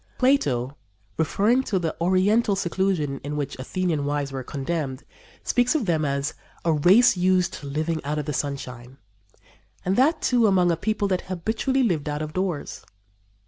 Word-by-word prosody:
Plato, 140 - +1 0.4
referring 205 - +2
to 195 - 0
the 165 -3 -2
oriental 200 +5 +3
seclusion 175 -6 -1
to 145 - -8
which 145 -2 -4
Athenian 165 +2 -1
wives 145 -1 -2
were 135 -1 -4
condemned, 140 0 -4 0.4
speaks 245 +3 +2
of 285 -8 +1
them 160 -4 +1
as 140 +1 -1 0.3
"a 165 - +3
race 200 +10 +5
used 180 0 +2
to 145 - -8
living 155 +3 -2
out 150 +2 -2
of 150 - -2
the 150 - -3
sunshine," 130 -2 -5 0.9
and 185 +2 +1
that, 305 +5 +3
too, 240 -3 +3
among 180 -3 +3
a - - +2
people 210 +4 -1
that 185 -1 0
habitually 220 +9 -1
lived 165 -10 0
out 150 +1 -2
of 155 0 -6
doors. 185 -5 -3
170 Hz, 165 wpm, -24 LUFS, 145-195 Hz, 0.9 s, race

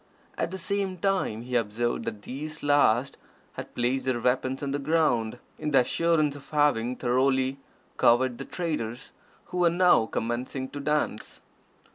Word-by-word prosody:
At 165 - -1
the 190 - -5
same 195 0 -2
time 180 - 0
he 125 0 -4
observed 120 +1 0
that 105 -1 -5
these 155 +4 -7
last 140 -3 +3 0.4
had - - -8
placed 125 +2 0
their 130 -2 0
weapons 130 +3 0
on 140 - -2
the 145 - -1
ground, 140 -7 +1 0.2
in 150 - -2
the 135 -3 +5
assurance 155 +2 +1
of 145 - -12
having 145 -5 +2
thoroughly 130 +2 +1 0.4
cowed 120 +1 +3
the - - -5
traders, 140 -9 -4 0.4
who 180 - -1
were 175 -1 +5
now 175 -9 +4
commencing 125 +4 -3
to 145 - -7
dance. 150 -6 -2
135 Hz, 155 wpm, -27 LUFS, 120-155 Hz, 0.4 s, the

